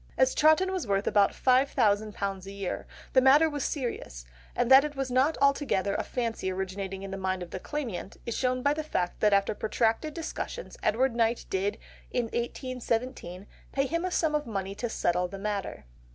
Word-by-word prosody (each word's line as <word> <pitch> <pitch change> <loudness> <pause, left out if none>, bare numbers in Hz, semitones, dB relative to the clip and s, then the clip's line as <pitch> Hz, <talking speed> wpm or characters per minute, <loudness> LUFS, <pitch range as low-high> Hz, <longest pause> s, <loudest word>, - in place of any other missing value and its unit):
As 260 0 +4
Chawton 315 +5 +4
was 370 -10 -3
worth 195 0 +1
about 205 -1 +4
£5000 210 -7 +1
a - - -6
year, 200 -2 -4 0.3
the 260 - +6
matter 280 +5 +6
was 290 -3 -3
serious, 235 - -4 0.3
and 245 +1 +1
that 265 +1 +9
it 300 -1 -4
was 270 -2 -3
not 265 +5 +3
altogether 275 -9 +2
a - - 0
fancy 230 -6 -2
originating 190 +1 -4
in 195 - -6
the 195 - -4
mind 185 -1 -1
of 170 - -11
the 185 - -4
claimant, 230 -8 -5
is 235 - -3
shown 255 -1 0
by 285 - +3
the 310 - -2
fact 180 - -2
that 210 - +4
after 200 +1 +3
protracted 225 +7 0
discussions, 340 +8 -5
Edward 240 +4 +2
Knight 230 0 +1
did, 200 +2 0 0.3
in 245 - 0
1817, 235 -5 -3 0.3
pay 275 0 +1
him 335 +5 -1
a 370 - 0
sum 320 -3 +1
of 300 -3 -1
money 195 -3 -3
to 240 +4 -4
settle 180 -3 0
the 195 +2 -8
matter. 200 - -4
235 Hz, 190 wpm, -28 LUFS, 195-275 Hz, 0.3 s, that